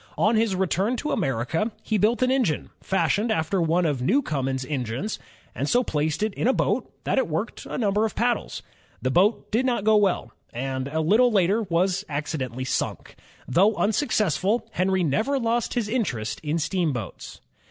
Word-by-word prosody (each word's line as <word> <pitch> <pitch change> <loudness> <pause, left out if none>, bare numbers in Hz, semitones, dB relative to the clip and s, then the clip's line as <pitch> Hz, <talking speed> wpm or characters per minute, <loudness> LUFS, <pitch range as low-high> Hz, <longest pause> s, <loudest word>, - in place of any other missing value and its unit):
On 220 +2 +3
his 220 -3 +2
return 190 +5 0
to 300 - -3
America, 160 - -1
he 215 -2 0
built 230 +5 +2
an 255 - +2
engine 250 - 0
fashioned 205 +3 +1
after 180 -1 0
one 170 +2 +2
of 145 -5 0
Newcomen's 135 - 0
engines, 130 - -3 0.3
and - - -2
so 245 +1 +3
placed 155 0 -1
it 215 -2 -1
in 225 - -1
a 260 - +4
boat - - 0
that - - +1
it - - 0
worked - - -4
a - - -4
number 210 -3 +1
of 220 - -1
paddles. 240 0 -1 0.4
The 130 - +1
boat 195 - +2
did 230 +4 +2
not 245 -5 0
go 215 0 +4
well, 200 -3 +1 0.2
and 130 +2 -3
a 160 +3 -1
little 225 +10 +4
later 200 +2 +3
was 185 +3 +1
accidentally 135 -4 -3
sunk. - - -3 0.3
Though 195 - +3
unsuccessful, 215 - +1
Henry 190 -1 +1
never 220 - +1
lost 235 -1 0
his 235 -4 0
interest 120 - -2
in 155 +1 -1
steamboats. 160 - -3
190 Hz, 175 wpm, -25 LUFS, 150-225 Hz, 0.4 s, a